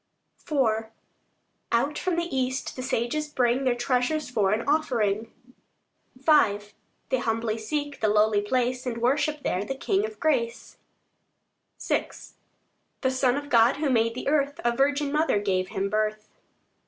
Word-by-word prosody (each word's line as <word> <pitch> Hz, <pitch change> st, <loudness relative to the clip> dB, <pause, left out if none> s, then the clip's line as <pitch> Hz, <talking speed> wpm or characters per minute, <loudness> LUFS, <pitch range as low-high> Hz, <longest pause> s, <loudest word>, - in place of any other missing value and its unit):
IV 225 Hz, -6 st, +1 dB, 0.9 s
Out 275 Hz, +6 st, +1 dB
from 365 Hz, -2 st, -1 dB
the 340 Hz, -3 st, -2 dB
east 260 Hz, 0 st, -2 dB
the 255 Hz, -, -5 dB
sages 255 Hz, +4 st, -1 dB
bring 255 Hz, -2 st, +1 dB
Their 250 Hz, -2 st, +2 dB
treasures 250 Hz, +4 st, 0 dB
for 205 Hz, -5 st, +2 dB
an 220 Hz, +4 st, -1 dB
offering. 230 Hz, -8 st, 0 dB, 0.8 s
V 260 Hz, -6 st, +4 dB, 0.5 s
They 260 Hz, -, +1 dB
humbly 225 Hz, -1 st, -1 dB
seek 290 Hz, +5 st, -3 dB
the 220 Hz, -, +3 dB
lowly 210 Hz, 0 st, +3 dB
place, 250 Hz, +3 st, -1 dB
And 235 Hz, -2 st, -2 dB
worship 285 Hz, +5 st, 0 dB
there 185 Hz, -, -1 dB
the 270 Hz, +6 st, -4 dB
King 390 Hz, +9 st, 0 dB
of 435 Hz, 0 st, -5 dB
grace: 245 Hz, -7 st, -1 dB, 1.0 s
VI -, -, -1 dB, 0.9 s
The 260 Hz, -, +1 dB
Son 260 Hz, 0 st, +1 dB
of 285 Hz, 0 st, -6 dB
God, 235 Hz, +1 st, +5 dB
who 290 Hz, -2 st, 0 dB
made 230 Hz, -1 st, +2 dB
the 255 Hz, -, -5 dB
earth, 285 Hz, -1 st, +1 dB
A 240 Hz, 0 st, +2 dB
virgin 285 Hz, +2 st, +1 dB
mother 305 Hz, -6 st, +2 dB
gave 185 Hz, -2 st, 0 dB
Him 195 Hz, +1 st, -2 dB
birth. 215 Hz, +1 st, -1 dB
250 Hz, 150 wpm, -26 LUFS, 225-285 Hz, 1.0 s, God